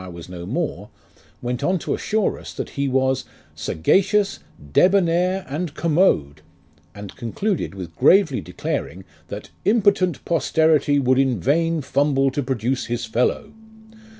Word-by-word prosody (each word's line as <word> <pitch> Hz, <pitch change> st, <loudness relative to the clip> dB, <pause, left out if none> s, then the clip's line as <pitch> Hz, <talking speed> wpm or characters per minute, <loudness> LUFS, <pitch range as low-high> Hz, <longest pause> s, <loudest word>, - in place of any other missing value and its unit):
was 85 Hz, -1 st, -10 dB
no 90 Hz, -1 st, -8 dB
more, -, -, -3 dB, 0.5 s
went 125 Hz, +2 st, -3 dB
on 185 Hz, +5 st, +2 dB
to -, -, -3 dB
assure 215 Hz, -2 st, -1 dB
us, -, -, -9 dB
that -, -, -6 dB
he 140 Hz, 0 st, -2 dB
was 130 Hz, 0 st, +1 dB, 0.3 s
"saga 80 Hz, -, +2 dB
cious, 200 Hz, +1 st, 0 dB, 0.3 s
debonair, 180 Hz, 0 st, +3 dB
and 150 Hz, +2 st, -4 dB
commode 150 Hz, -, +1 dB, 0.3 s
;" 80 Hz, +1 st, -34 dB
and 100 Hz, -1 st, -9 dB
concluded 165 Hz, -, -3 dB
with 85 Hz, -4 st, -8 dB
gravely 155 Hz, 0 st, +4 dB
declaring, 90 Hz, 0 st, -4 dB, 0.2 s
that -, -, -8 dB
" -, -, -37 dB
impotent 200 Hz, -5 st, +2 dB
posterity 160 Hz, -3 st, +2 dB
would 130 Hz, -1 st, +2 dB
in 130 Hz, -5 st, +1 dB
vain 165 Hz, -, +1 dB
fumble 135 Hz, 0 st, +1 dB
to 145 Hz, -, -2 dB
produce 130 Hz, -1 st, -2 dB
his 120 Hz, 0 st, -2 dB
fellow." 125 Hz, -, -1 dB
140 Hz, 145 wpm, -22 LUFS, 115-175 Hz, 0.5 s, gravely